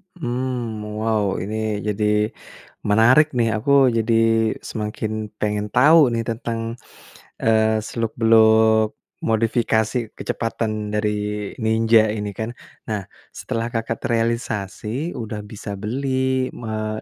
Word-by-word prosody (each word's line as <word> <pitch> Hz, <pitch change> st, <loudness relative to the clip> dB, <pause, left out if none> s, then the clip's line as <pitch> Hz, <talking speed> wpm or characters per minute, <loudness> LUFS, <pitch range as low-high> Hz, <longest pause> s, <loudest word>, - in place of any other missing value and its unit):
Mmm, 125 Hz, -6 st, -3 dB, 0.2 s
wow, 110 Hz, -3 st, 0 dB
ini 110 Hz, 0 st, -3 dB
jadi, 105 Hz, +1 st, +1 dB, 0.6 s
menarik 120 Hz, +8 st, +6 dB
nih. 115 Hz, -1 st, +2 dB
Aku 140 Hz, +6 st, -1 dB, 0.3 s
jadi 115 Hz, +1 st, +1 dB, 0.6 s
semakin 105 Hz, 0 st, -3 dB, 0.3 s
pengen 105 Hz, 0 st, -1 dB
tau 150 Hz, +4 st, +6 dB
nih 115 Hz, 0 st, -1 dB
tentang, 115 Hz, 0 st, -3 dB, 0.8 s
eee, 110 Hz, -1 st, +3 dB
seluk-beluk 110 Hz, -1 st, +3 dB, 0.3 s
modifikasi 110 Hz, 0 st, +1 dB, 0.2 s
kecepatan 115 Hz, -1 st, -2 dB, 0.2 s
dari 105 Hz, 0 st, +1 dB, 0.5 s
Ninja 110 Hz, 0 st, +4 dB
ini 105 Hz, -1 st, -3 dB
kan. 110 Hz, +1 st, -2 dB, 0.4 s
Nah, 105 Hz, -2 st, -1 dB, 0.3 s
setelah 115 Hz, 0 st, -3 dB
Kakak 115 Hz, 0 st, -2 dB
terealisasi, 115 Hz, -, -2 dB
udah 110 Hz, -2 st, -5 dB
bisa 105 Hz, -1 st, -6 dB
beli, 130 Hz, +2 st, -1 dB
mmm, 110 Hz, -1 st, -4 dB
110 Hz, 100 wpm, -22 LUFS, 110-115 Hz, 0.8 s, menarik